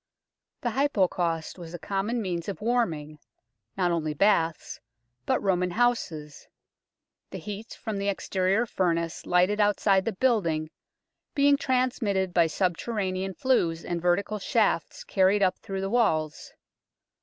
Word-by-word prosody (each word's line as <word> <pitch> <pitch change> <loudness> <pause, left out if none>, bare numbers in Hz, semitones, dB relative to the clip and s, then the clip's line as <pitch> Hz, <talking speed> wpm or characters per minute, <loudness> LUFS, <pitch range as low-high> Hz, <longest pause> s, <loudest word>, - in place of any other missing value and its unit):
The 240 - -1
Hypocaust 185 - 0
was 170 0 -8
a - - -4
common 205 +6 -2
means 175 -1 -3
of 200 - -5
warming, 170 -11 -1 0.6
not 180 -2 +2
only 155 -3 -1
baths, 165 -3 +1 0.5
but - - +2
Roman 180 -2 +1
houses, 175 -9 -1 0.8
the - - -6
heat 210 +2 -7
from 220 -2 -3
the 200 - -2
exterior 195 +2 +1
furnace 170 -6 -1
lighted 180 +4 +3
outside 200 -2 +3
the 230 - 0
building 170 -10 +1 0.6
being 285 0 +5
transmitted 245 -9 0
by 170 -2 +4
subterranean 185 +2 -2
flues 170 -9 +1
and 170 -1 -3
vertical 200 +4 +1
shafts 200 -6 0
carried 195 +1 +3
up 185 - +1
through 195 -1 -5
the 195 - -1
walls. 155 -11 0
190 Hz, 130 wpm, -27 LUFS, 170-215 Hz, 0.8 s, being